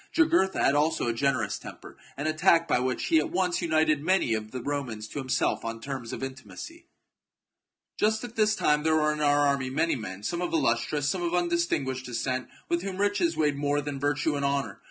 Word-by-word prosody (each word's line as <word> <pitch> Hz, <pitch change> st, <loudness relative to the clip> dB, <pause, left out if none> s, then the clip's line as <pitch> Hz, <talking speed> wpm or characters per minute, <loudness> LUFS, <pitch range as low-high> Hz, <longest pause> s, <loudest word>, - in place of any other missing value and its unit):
Jugurtha 325 Hz, -, +3 dB
had -, -, +4 dB
also 150 Hz, -2 st, +1 dB
a -, -, 0 dB
generous 115 Hz, -4 st, 0 dB
temper, -, -, -11 dB, 0.2 s
and 145 Hz, +3 st, -2 dB
a 155 Hz, -, +1 dB
tact 165 Hz, +1 st, +4 dB
by 145 Hz, -, +2 dB
which 130 Hz, 0 st, -1 dB
he 160 Hz, -, +4 dB
at 155 Hz, -, -1 dB
once 180 Hz, -1 st, 0 dB
united 155 Hz, -3 st, +2 dB
many 180 Hz, -7 st, +2 dB
of 110 Hz, -1 st, -3 dB
the 125 Hz, +1 st, -6 dB
Romans 125 Hz, -7 st, -3 dB
to -, -, -5 dB
himself 130 Hz, -1 st, 0 dB
on 115 Hz, 0 st, -4 dB
terms 130 Hz, -2 st, -6 dB
of -, -, -5 dB
intimacy. 295 Hz, -, -8 dB
CHAP. -, -, -55 dB
Just 220 Hz, +1 st, +2 dB
at 240 Hz, -1 st, -8 dB
this 215 Hz, -1 st, +3 dB
time 150 Hz, -5 st, +2 dB
there 160 Hz, +1 st, +2 dB
were 150 Hz, -1 st, +2 dB
in 150 Hz, -, -5 dB
our 145 Hz, 0 st, +3 dB
army 140 Hz, -2 st, +1 dB
many 160 Hz, +5 st, +1 dB
men, 100 Hz, -5 st, -7 dB
some 170 Hz, +9 st, -2 dB
of 175 Hz, -, -2 dB
illustrious, 140 Hz, 0 st, +1 dB
some 180 Hz, +4 st, 0 dB
of 175 Hz, 0 st, 0 dB
undistinguished 170 Hz, -7 st, 0 dB
descent, 130 Hz, +2 st, -2 dB, 0.2 s
with 170 Hz, 0 st, 0 dB
whom 190 Hz, 0 st, -5 dB
riches 200 Hz, -5 st, +1 dB
weighed 150 Hz, -3 st, +1 dB
more 145 Hz, 0 st, +1 dB
than 145 Hz, -1 st, -4 dB
virtue 145 Hz, +2 st, 0 dB
and 140 Hz, -, -2 dB
honour. 140 Hz, -7 st, -1 dB
145 Hz, 215 wpm, -27 LUFS, 130-170 Hz, 0.2 s, had